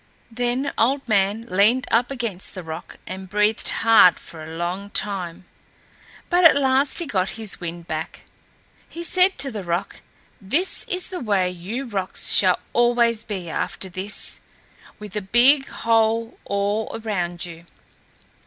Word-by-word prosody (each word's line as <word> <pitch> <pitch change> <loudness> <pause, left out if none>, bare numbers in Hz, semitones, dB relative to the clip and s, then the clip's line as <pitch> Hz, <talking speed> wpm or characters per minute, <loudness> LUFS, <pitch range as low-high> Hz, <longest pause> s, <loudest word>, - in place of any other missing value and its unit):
Then 245 +4 -1
Old 270 +3 +1
Man 205 0 +1
leaned 220 +6 +3
up 235 +2 +3
against 230 -10 -4
the 185 - -6
rock, 160 -1 -8
and 190 +1 -8
breathed 210 +2 +1
hard 225 -5 +5
for 160 -2 -11
a 160 +1 -8
long 180 +4 -3
time, 185 -5 -4 0.8
but 355 0 +2
at 330 - +8
last 275 0 +2
he 345 - +1
got 190 -7 -2
his 220 -3 -5
wind 170 0 -6
back. 160 -1 -5 0.7
He 340 - -7
said 370 +2 +3
to 270 -1 0
the 210 -4 -5
rock, 175 +3 -3 0.4
"This 285 - 0
is 365 0 -1
the 370 -2 -5
way 195 -6 +1
you 195 +10 -5
rocks 195 -6 0
shall - - +5 0.2
always 240 -2 +3
be 190 -5 -5
after 190 +3 -3
this, 190 +3 -3 0.6
with 210 -1 -10
a 210 - -1
big 250 +8 +4
hole 225 0 0
all 200 +2 -1
around 175 -5 -2
you." 170 -1 -10
210 Hz, 150 wpm, -22 LUFS, 185-245 Hz, 0.8 s, at